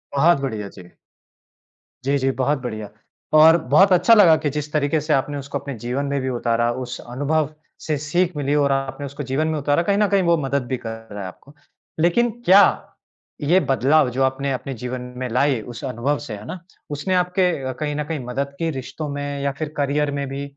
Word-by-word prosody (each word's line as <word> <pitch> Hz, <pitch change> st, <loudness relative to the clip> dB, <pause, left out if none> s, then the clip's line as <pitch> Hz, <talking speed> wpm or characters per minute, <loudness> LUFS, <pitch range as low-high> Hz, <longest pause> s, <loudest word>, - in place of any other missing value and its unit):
बहुत 155 Hz, +2 st, +4 dB
बढ़िया, 110 Hz, -7 st, -4 dB
जी। 90 Hz, -3 st, -14 dB, 1.1 s
जी, 140 Hz, +2 st, +1 dB
जी 135 Hz, 0 st, +1 dB
बहुत 135 Hz, +3 st, 0 dB
बढ़िया। 110 Hz, -4 st, -5 dB, 0.5 s
और 160 Hz, +2 st, +8 dB
बहुत 190 Hz, +7 st, +6 dB
अच्छा 205 Hz, +6 st, +5 dB
लगा 190 Hz, -8 st, +7 dB
कि 145 Hz, -, +1 dB
जिस 150 Hz, +1 st, -4 dB
तरीके 150 Hz, +1 st, +1 dB
से 155 Hz, +1 st, 0 dB
आपने 145 Hz, +1 st, 0 dB
उसको 140 Hz, 0 st, -4 dB
अपने 140 Hz, -, -6 dB
जीवन 125 Hz, +5 st, -2 dB
में 140 Hz, 0 st, -1 dB
भी 130 Hz, -, -2 dB
उतारा 120 Hz, -1 st, 0 dB
उस 125 Hz, 0 st, -7 dB
अनुभव 145 Hz, +4 st, -1 dB, 0.3 s
से 155 Hz, -, 0 dB
सीख 170 Hz, +5 st, 0 dB
मिली 140 Hz, 0 st, 0 dB
और 140 Hz, -1 st, +2 dB
आपने 135 Hz, +1 st, -2 dB
उसको 140 Hz, +2 st, -6 dB
जीवन 135 Hz, +4 st, -1 dB
में 160 Hz, -1 st, -1 dB
उतारा। 145 Hz, +3 st, +1 dB
कहीं 200 Hz, +3 st, +1 dB
न 210 Hz, 0 st, +3 dB
कहीं 200 Hz, -1 st, +3 dB
वो 170 Hz, -1 st, +3 dB
मदद 140 Hz, -2 st, -1 dB
भी 130 Hz, -, -2 dB
कर 115 Hz, -1 st, -8 dB
रहा 105 Hz, -, -6 dB
है 95 Hz, -, -5 dB
आपको। 135 Hz, +10 st, -14 dB, 0.5 s
लेकिन 175 Hz, +9 st, +3 dB, 0.2 s
क्या 195 Hz, +3 st, +8 dB, 0.8 s
ये 165 Hz, +6 st, +4 dB
बदलाव 135 Hz, -1 st, +3 dB
जो 130 Hz, +2 st, 0 dB
आपने 135 Hz, +1 st, 0 dB
अपने 135 Hz, +1 st, -4 dB
जीवन 125 Hz, +2 st, -5 dB, 0.2 s
में 130 Hz, -, -3 dB
लाए 130 Hz, +2 st, +2 dB
उस 120 Hz, +1 st, -9 dB
अनुभव 135 Hz, +3 st, -1 dB
से 135 Hz, -7 st, -7 dB
है 105 Hz, -, -11 dB
ना? 185 Hz, -, -6 dB, 0.3 s
उसने 150 Hz, +6 st, -2 dB
आपके 180 Hz, 0 st, +2 dB, 0.2 s
अ, -, -, -1 dB
कहीं 150 Hz, -1 st, -2 dB
न 150 Hz, -, -1 dB
कहीं 155 Hz, +1 st, -4 dB
मदद 140 Hz, +3 st, -3 dB
की 165 Hz, -1 st, 0 dB
रिश्तों 135 Hz, +4 st, -6 dB
में 145 Hz, 0 st, -4 dB
या 140 Hz, 0 st, 0 dB
फ़िर 155 Hz, -1 st, -4 dB
करियर 145 Hz, +1 st, 0 dB
में 140 Hz, -1 st, -3 dB
भी? 140 Hz, +1 st, -4 dB
140 Hz, 215 wpm, -21 LUFS, 130-155 Hz, 1.1 s, और